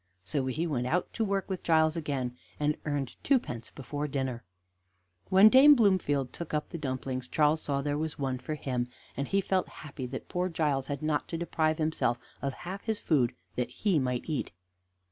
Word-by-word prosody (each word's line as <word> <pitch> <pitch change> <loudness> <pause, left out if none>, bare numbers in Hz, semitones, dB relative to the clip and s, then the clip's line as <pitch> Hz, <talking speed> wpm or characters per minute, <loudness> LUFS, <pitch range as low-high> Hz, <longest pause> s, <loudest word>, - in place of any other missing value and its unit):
So 135 +4 -1
he 155 +6 -1
went 125 -7 -1
out 175 +6 0
to 225 - 0
work 200 -2 0
with 190 -3 -3
Giles 160 -1 +3
again, 135 -6 -2 0.2
and 150 0 +2
earned 145 -4 -2
twopence 125 - 0
before 145 +2 -4
dinner. 130 -4 -2 0.9
When 190 +3 +8
Dame 270 +5 +9
Bloomfield 185 - +2
took 170 -2 -4
up 150 - -2
the 170 - -6
dumplings 130 -2 -3
Charles 150 +3 +3
saw 140 -1 -1
there 145 0 -1
was 160 -1 -3
one 130 -2 -1
for 155 - -4
him, 125 -4 -2 0.3
and 140 +2 -2
he 195 0 +2
felt 190 -1 0 0.2
happy 135 -3 -6
that 130 +1 -6
poor 180 0 -1
Giles 150 -5 0
had 145 0 -4
not 155 -1 0
to 165 - -3
deprive 160 -2 0
himself 155 -7 +1 0.2
of 140 -1 -1
half 190 +3 -6
his 220 -2 -1
food 130 -7 +2 0.2
that 125 - 0
he 195 -7 +1
might 125 -2 -1
eat. 155 -4 -2
150 Hz, 190 wpm, -30 LUFS, 135-170 Hz, 0.9 s, Dame